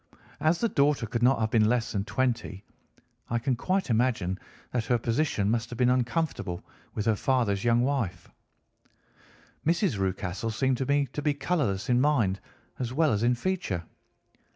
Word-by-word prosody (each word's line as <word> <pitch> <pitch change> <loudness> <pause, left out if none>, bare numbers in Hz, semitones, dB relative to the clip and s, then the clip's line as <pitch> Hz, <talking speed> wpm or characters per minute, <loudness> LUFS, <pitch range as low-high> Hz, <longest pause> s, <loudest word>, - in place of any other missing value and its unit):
As 160 +2 +2
the 235 - +3
daughter 140 - +2
could 115 +1 -3
not 125 0 +4
have 110 0 0
been 110 -2 +4
less 120 -1 0
than 100 -1 -2
twenty, 115 -6 -1 0.7
I 120 - +1
can 125 +2 0
quite 185 +4 -1
imagine 110 -6 +1 0.3
that 120 -2 -1
her 120 - +2
position 115 -3 0
must 115 0 -1
have 120 - -7
been 125 0 +4
uncomfortable 125 - -1 0.3
with 105 - -2
her 110 -2 +3
father's 110 -5 +1
young 120 0 +3
wife. 110 -11 -1 1.4
"Mrs. 165 - +1
Rucastle 95 +3 -2
seemed 130 +3 +1
to 130 - -2
me 140 0 +3
to 150 - -3
be 145 -1 +1
colourless 140 - -1
in 125 0 +3
mind 115 -10 +2 0.4
as 120 -2 -2
well 155 +2 +2
as 105 - 0
in 120 +1 +3
feature. 120 - -2
120 Hz, 170 wpm, -28 LUFS, 110-140 Hz, 1.4 s, not